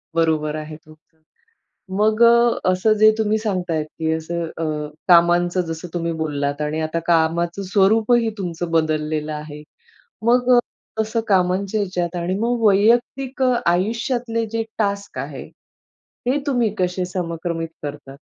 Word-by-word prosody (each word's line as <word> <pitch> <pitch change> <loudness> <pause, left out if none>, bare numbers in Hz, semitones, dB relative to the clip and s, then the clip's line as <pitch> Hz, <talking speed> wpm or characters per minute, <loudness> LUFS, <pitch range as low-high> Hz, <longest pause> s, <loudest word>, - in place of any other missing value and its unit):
बरोबर 155 -2 +1
आहे 155 0 -6
तो, 155 0 -15 1.0
मग 215 +2 +2
अ, 235 0 +5
असं 185 +4 +2
जे 215 0 +7
तुम्ही 215 -1 +1
सांगताय 180 -7 -1
की 160 +1 -4
असं 170 +2 -3
अ, 165 - -2 0.4
कामांचं 175 +1 +4
जसं 165 +2 -6
तुम्ही 170 -1 -2
बोललात 145 -1 -2
आणि 150 +1 -2
आता 155 +1 -2
कामाचं 170 +3 +1
स्वरूपही 220 +4 +3
तुमचं 175 -3 -4
बदललेलं 155 -1 0
आहे. 150 0 -8 0.6
मग 245 +1 +4 0.4
तसं 220 +1 0
कामांच्या 190 +1 +1
याच्यात 180 -3 -2
आणि 175 +2 -1
मग 235 +1 0
वैयक्तिक 240 +6 +2
अ, 255 -1 +3 0.2
आयुष्यातले 230 +5 -1
जे 225 0 -1
टास्क 200 -2 -2
आहे. - - -6 0.8
हे 260 +3 +2
तुम्ही 240 -6 +1
कसे 180 0 0
समक्रमित 170 -2 -4
करतात? 145 -2 -7
180 Hz, 130 wpm, -21 LUFS, 160-220 Hz, 1.0 s, जे